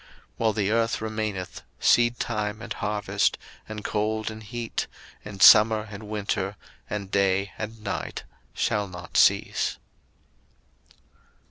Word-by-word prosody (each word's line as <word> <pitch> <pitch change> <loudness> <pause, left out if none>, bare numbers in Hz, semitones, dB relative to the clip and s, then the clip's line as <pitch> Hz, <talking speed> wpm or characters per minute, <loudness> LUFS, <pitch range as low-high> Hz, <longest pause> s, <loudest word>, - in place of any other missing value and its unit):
01:008:022 - - -22 0.3
While 110 -1 +2
the 105 -1 0
earth 115 0 +1
remaineth, 110 -5 -4 0.2
seedtime 115 -3 +2
and - - -5
harvest, 105 0 0 0.3
and 105 -1 -6
cold 110 +1 -1
and 110 0 -9
heat, 115 +2 -4 0.4
and 105 -2 -2
summer 110 0 +8
and 105 +1 -8
winter, 100 -1 -2 0.3
and 100 -2 -4
day 100 0 +2
and 110 0 -7
night 100 - -4 0.3
shall 105 -2 0
not 90 -2 -10
cease. - - +3
105 Hz, 120 wpm, -26 LUFS, 100-110 Hz, 0.4 s, summer